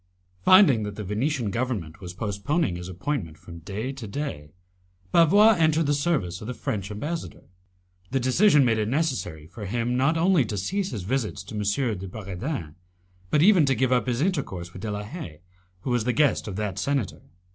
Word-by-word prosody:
Finding 185 - +7
that 105 -1 -4
the 105 - -5
Venetian 115 - -1
government 105 -7 -3
was 90 -1 -8
postponing 105 - -1
his 90 0 -6
appointment 90 - -3
from 85 0 -11
day 105 +9 -4
to 135 -5 -8
day, 100 - -5 0.6
Bavois 205 +7 +6
entered 160 0 +3
the 145 - +2
service 140 - -1
of 105 - -7
the 125 - -4
French 100 -3 -3
ambassador. 150 +11 -5 0.7
The 135 - 0
decision 140 +4 +4
made 115 -2 +2
it 105 - 0
necessary 125 - -1
for 100 +5 -8
him 120 +4 -1
not 145 +6 +2
only 175 -3 +4
to 105 -1 -4
cease 190 - -1
his 105 -7 -5
visits 110 -3 -2
to 100 - -11
M. 105 +1 0
de 95 - -6
Bragadin, 95 - -5 0.6
but 150 +7 +3
even 190 -4 +6
to 135 - +3
give 130 -1 +1
up 125 0 +2
his 125 +1 0
intercourse 115 - -2
with 95 - -9
De 110 - -3
la 105 0 -3
Haye, 105 - -8 0.4
who 125 - -3
was 120 -2 +1
the 125 - +1
guest 145 -1 +2
of 100 - -5
that 100 -2 -3
senator. 140 -2 -1
115 Hz, 190 wpm, -25 LUFS, 100-145 Hz, 0.7 s, Finding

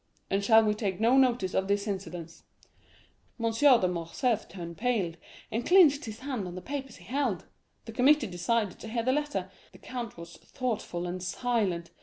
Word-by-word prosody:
and 195 +1 +1
shall 220 +1 +6
we 210 - +2
take 200 -3 -3
no 230 +4 +4
notice 245 -8 +3
of 190 - +1
this 200 0 +1
incident?' 175 -5 -6 1.0
M. 230 0 +1
de 245 -5 +5
Morcerf 180 +7 -1
turned 170 -3 -7
pale, 215 -7 0 0.4
and 230 +2 -1
clenched 315 -3 +5
his 220 +1 -8
hands 255 -8 -3
on 175 - -7
the - - -4
papers 270 +4 -6
he 175 - -15
held. 245 - -1 0.4
The - - -7
committee 265 +4 +4
decided 200 +2 -1
to - - -8
hear 230 +1 -2
the 255 +2 +2
letter; 295 0 -2 0.2
the - - -15
count 240 -6 -6
was 170 0 -10
thoughtful 215 -8 -4
and 180 +1 -4
silent. 190 -4 -1
220 Hz, 180 wpm, -29 LUFS, 185-250 Hz, 1.0 s, shall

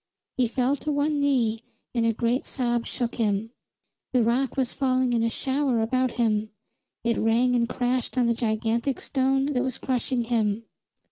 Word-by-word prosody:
He 250 -2 +2
fell 255 +4 +1
to 300 - -3
one 290 +1 +1
knee, 245 -6 +1 0.3
and 230 -2 +1
a - - +4
great 235 +3 0
sob 240 -3 -1
shook 240 -2 -3
him. 215 0 0 0.6
The 250 -2 +4
rock 245 +4 0
was 255 -2 0
falling 255 -2 +1
in 230 - +2
a 230 - +2
shower 265 0 0
about 255 +3 +1
him; 220 -3 +1 0.5
it 235 -1 +1
rang 240 +3 +3
and 235 -1 +1
crashed 250 0 -1
on 250 - +4
the 235 - +3
gigantic 230 +3 -1
stone 270 +1 +1
that 250 - +1
was 260 -2 -2
crushing 255 -1 -1
him. 225 -2 0
245 Hz, 175 wpm, -26 LUFS, 230-260 Hz, 0.6 s, a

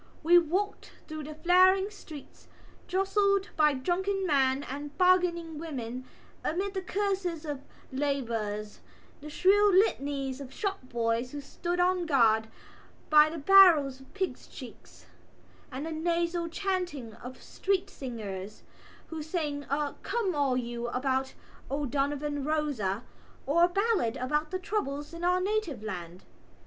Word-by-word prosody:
We 350 +2 +7
walked 375 +5 -2
through 310 -2 -6
the 305 +1 -8
flaring 370 +4 +4
streets, 315 -8 -12 0.4
jostled 395 +1 +1
by 300 -2 +4
drunken 380 +8 -1
men 270 -3 +2
and 285 +2 -7
bargaining 350 -3 +2
women, 255 -6 -5 0.4
amid 380 +5 -1
the 380 - -2
curses 375 -4 -2
of 290 -3 -4 0.3
labourers, 230 -7 -2 0.4
the 300 - -8
shrill 405 +6 +4
litanies 280 -8 +1
of 265 -2 -8
shop 390 +6 -2
boys 235 +1 -1
who 290 - -4
stood 345 +5 -4
on 360 -1 +2
guard 225 -6 +4 0.6
by 300 0 +7
the 330 - -6
barrels 315 -6 +6
of 265 - -17
pigs' 385 -2 -3
cheeks, - - -12 0.7
the 260 - -5
nasal 340 +1 0
chanting 355 - -3
of 250 +4 -10
street 390 0 -1
singers, 215 - -7 0.5
who 320 -1 -5
sang 300 -3 -3
a 285 +1 -1
come 450 -6 -1
all 280 -4 +1
you 240 -1 -3
about 265 +2 -1 0.3
O'Donovan 285 +1 -1
Rossa, 270 -9 -1 0.4
or 335 +5 +4
a - - -1
ballad 395 - +1
about 300 +4 -1
the 370 - -2
troubles 300 -7 -3
in 335 +1 -7
our 360 +1 +3
native 375 - -1
land. 180 -4 -6
300 Hz, 135 wpm, -29 LUFS, 265-365 Hz, 0.7 s, We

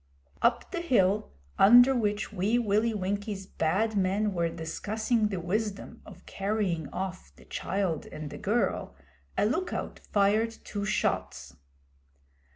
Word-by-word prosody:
Up - - +1
the 345 -2 -2
hill 210 - +2 0.3
under 245 +6 +8
which 210 -3 -1
Wee 205 +5 +1
Willie 220 0 +2
Winkie's 200 0 -3
Bad 195 +6 0
Men 200 +2 +1
were 170 -2 0
discussing 210 +8 -1
the 195 -3 -3
wisdom 200 +4 -3
of - - -13
carrying 195 -6 -2
off 185 0 -5
the - - -18
child 190 -5 -2
and 150 -1 -7
the - - -8
girl, - - -1 0.4
a - - +3
look 335 - 0
out - - -4
fired 210 +3 +3
two 200 -1 -4
shots. 195 - -1
205 Hz, 135 wpm, -28 LUFS, 185-220 Hz, 0.4 s, under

